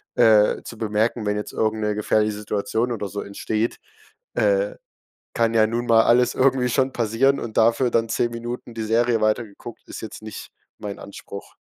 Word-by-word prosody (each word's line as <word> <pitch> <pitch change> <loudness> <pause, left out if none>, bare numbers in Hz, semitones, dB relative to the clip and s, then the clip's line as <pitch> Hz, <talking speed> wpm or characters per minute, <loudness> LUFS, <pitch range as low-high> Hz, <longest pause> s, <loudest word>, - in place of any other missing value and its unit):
äh, 110 -3 +5
zu - - -9
bemerken, 110 +1 0
wenn 105 0 0
jetzt 105 - -5
irgend 110 0 0
'ne 105 0 +1
gefährliche 105 0 +1
Situation 105 +3 -2
oder 105 -4 -3
so 100 +2 -4
entsteht. 110 +3 -2 0.6
Äh, - - +1 0.6
kann 115 -1 +1
ja 110 -1 +4
nun 120 +2 -2
mal 115 -1 +6
alles 125 +2 +3
irgendwie 130 -1 +2
schon 130 +2 +1
passieren 120 +5 +2
und 110 -2 -6
dafür 115 +2 +3
dann 115 0 +1
10 120 +1 0
Minuten 120 +1 -6
die 115 -1 -4
Serie 115 +1 +2
weiter 110 +2 +2
geguckt, 110 +3 -12
ist - - -8
jetzt 110 - -8
nicht 110 -1 -8 0.3
mein 100 -1 -6
Anspruch. 100 0 -10
115 Hz, 180 wpm, -23 LUFS, 105-120 Hz, 0.6 s, mal